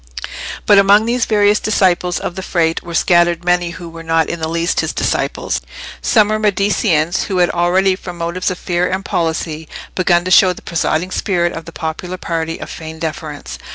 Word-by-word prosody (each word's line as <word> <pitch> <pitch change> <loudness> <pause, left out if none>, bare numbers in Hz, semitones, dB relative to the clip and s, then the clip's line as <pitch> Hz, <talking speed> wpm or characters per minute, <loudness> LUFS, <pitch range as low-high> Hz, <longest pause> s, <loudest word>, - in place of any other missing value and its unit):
But 205 -1 +6
among 200 +2 +5
these 240 +1 +1
various 210 -1 +3
disciples 180 -4 +1
of - - -4
the 190 - -6
Frate 165 -3 0
were 170 -1 -7
scattered 175 0 +3
many 175 -1 +2
who 170 0 -8
were 165 0 -9
not 165 0 +1
in 170 - -4
the 160 - -2
least 170 +2 0
his - - -1
disciples. - - -1 0.4
Some 215 -3 +3
were 215 0 0
Mediceans 200 -5 +1
who 190 - -2
had 175 -1 +3
already, 185 +2 +2
from 180 -2 -9
motives 170 +3 -2
of 185 - -4
fear 180 0 -1
and 190 +1 -3
policy, 160 -2 -2 0.2
begun 175 -1 +2
to 185 - -2
show 185 0 +6
the - - -14
presiding 170 +1 -1
spirit 175 -4 0
of 165 - -7
the 170 - -9
popular 165 +3 -5
party 165 -2 -3
a - - -7
feigned 160 -1 -9
deference. 155 -2 -5
175 Hz, 190 wpm, -17 LUFS, 165-190 Hz, 0.4 s, But